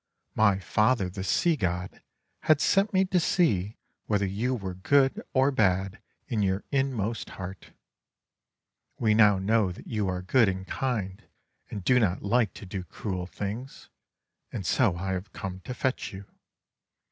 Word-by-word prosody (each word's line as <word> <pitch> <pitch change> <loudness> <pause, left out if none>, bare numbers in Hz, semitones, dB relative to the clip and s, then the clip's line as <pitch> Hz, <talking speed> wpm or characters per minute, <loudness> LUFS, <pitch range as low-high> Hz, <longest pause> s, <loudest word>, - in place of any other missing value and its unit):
My 100 -3 +4
father, 105 +1 +1
the 95 +1 -5
Sea 165 - +2
God, 90 - -3 0.4
had 155 -2 +3
sent 195 +5 +3
me 190 0 +3
to 185 -1 +2
see 110 - +1 0.3
whether 100 -2 +1
you 110 +7 -1
were 95 -5 -5
good 135 +9 +2
or 135 +2 +3
bad 95 -4 +1 0.3
in 110 -4 -1
your 95 0 0
inmost 120 -6 -1
heart. 95 -1 -8 1.3
We 110 -2 +2
now 105 -2 +6
know 100 0 +2
that 90 - -11
you 105 -3 -1
are 90 -1 -2
good 110 +2 +4
and 95 0 -4
kind, 105 -6 -3 0.5
and 100 - -6
do 125 +6 +4
not 95 -6 0
like 115 +2 +1
to - - -9
do 95 0 -5
cruel 90 +1 -5
things; 105 +8 -6 0.6
and 100 -6 -5
so 105 0 +2
I 95 +2 -3
have 95 +2 -4
come 95 -1 -5
to 125 - -4
fetch 130 0 -2
you. 95 +1 -9
105 Hz, 160 wpm, -27 LUFS, 95-125 Hz, 1.3 s, now